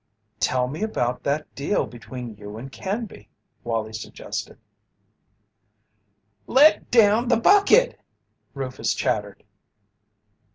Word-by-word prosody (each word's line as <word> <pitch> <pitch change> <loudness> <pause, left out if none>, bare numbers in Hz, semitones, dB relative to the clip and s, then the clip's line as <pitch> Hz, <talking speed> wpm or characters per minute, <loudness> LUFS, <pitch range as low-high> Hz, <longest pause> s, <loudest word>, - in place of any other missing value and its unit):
"Tell 125 -1 +1
me 150 +8 -6
about 125 - -1
that 150 +2 -2
deal 145 +9 0
between 120 0 -9
you 105 +1 -9
and 130 +4 -8
Canby," 195 - -5 0.3
Wallie 115 -2 -3
suggested. 110 - -6 1.9
"Let 290 +4 +5
down 225 0 +4
the 240 - +3
bucket!" 405 - +4 0.6
Rufus 130 -2 -2
chattered. 105 -1 -2
135 Hz, 95 wpm, -24 LUFS, -, 1.9 s, Let